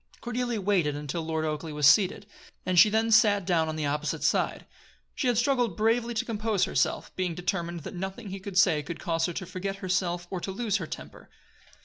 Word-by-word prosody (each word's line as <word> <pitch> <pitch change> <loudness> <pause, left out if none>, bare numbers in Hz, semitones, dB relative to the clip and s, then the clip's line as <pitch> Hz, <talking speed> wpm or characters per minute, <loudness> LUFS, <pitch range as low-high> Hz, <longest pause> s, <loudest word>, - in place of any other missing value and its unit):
Cordelia 240 -1 -2
waited 185 -7 +1
until 150 +3 -4
Lord 160 0 -2
Oakleigh 155 0 -4
was 150 -1 +1
seated; 195 +5 +5 0.4
and 180 -1 +3
she 215 - +8
then 225 +2 +1
sat 205 -3 +5
down 165 -3 +1
on 155 - -3
the 155 -1 -2
opposite 150 +1 -2
side. - - +1 0.5
She 260 - -1
had 245 -2 +2
struggled 245 -6 +1
bravely 230 +2 +1
to 220 - -1
compose 215 -3 0
herself, - - 0
being 180 -3 -2
determined 175 -1 -3
that - - -8
nothing 190 +2 -6
he 195 - -5
could 190 -1 -6
say 175 -6 +4
should 165 +3 -7
cause 165 -2 0
her 175 - -4
to 185 - -5
forget 195 +3 -4
herself 180 -2 -1
or 185 - -2
to - - -4
lose 215 +1 -1
her 170 -5 -5
temper. - - -9
185 Hz, 210 wpm, -27 LUFS, 165-215 Hz, 0.5 s, she